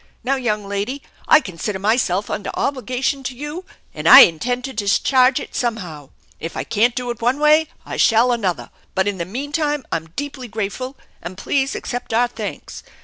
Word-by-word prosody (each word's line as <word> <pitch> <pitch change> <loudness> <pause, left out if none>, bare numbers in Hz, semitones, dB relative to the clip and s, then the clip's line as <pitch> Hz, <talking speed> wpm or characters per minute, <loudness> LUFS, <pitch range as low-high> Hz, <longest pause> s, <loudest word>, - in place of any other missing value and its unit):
Now, 270 +2 +1
young 215 -6 -2
lady, 205 +8 -3 0.2
I 310 - +7
consider 190 - -4
myself 205 -1 +1
under 200 - -3
obligation 260 +1 -1
to 255 -1 -5
you, 295 +6 -6 0.3
and - - 0
I - - +12
intend 245 +10 +2
to 265 - -6
discharge 255 +5 +3
it - - -9
somehow. 180 - -4 0.3
If 165 - -6
I - - -2
can't 230 +3 +1
do 245 -1 -2
it 235 - -8
one 245 +4 +2
way 305 +1 +4 0.2
I - - -6
shall 235 +2 +4
another, 200 -7 -2 0.2
but 190 +1 +1
in 200 -2 -2
the 170 - -2
meantime 290 - -2
I'm 165 -1 -2
deeply 275 -2 -5
grateful, 225 +5 -4 0.2
and 175 +2 -8
please 270 +6 -1
accept 245 -2 -4
our 245 +1 +3
thanks. 225 -3 -7
240 Hz, 180 wpm, -20 LUFS, 200-270 Hz, 0.3 s, I